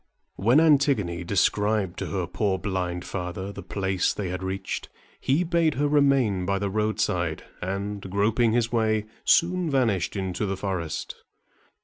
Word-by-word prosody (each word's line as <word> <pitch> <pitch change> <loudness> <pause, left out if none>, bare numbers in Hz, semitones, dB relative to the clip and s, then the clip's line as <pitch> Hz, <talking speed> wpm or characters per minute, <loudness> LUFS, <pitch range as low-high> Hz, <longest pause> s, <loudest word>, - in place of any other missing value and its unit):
When 120 +9 +4
Antigone 135 - +3
described 100 +1 +1
to - - -3
her 95 -3 -2
poor 100 +1 -1
blind 90 -2 -3
father 95 +1 -4
the - - -8
place 95 -2 -1
they 100 -4 -3
had 90 +1 -4
reached, 95 0 -4 0.3
he 145 +7 +1
bade 170 -3 +1
her 145 +3 +1
remain 135 -10 +3
by 100 +2 0
the 100 0 -2
roadside, 105 0 -1 0.2
and, 100 +2 -3
groping 110 +4 +2
his 120 0 +1
way, 110 -2 +1 0.2
soon 175 0 +3
vanished 115 - +1
into 95 +1 -2
the 95 0 -2
forest. 90 -5 -4
100 Hz, 145 wpm, -25 LUFS, 95-120 Hz, 0.3 s, When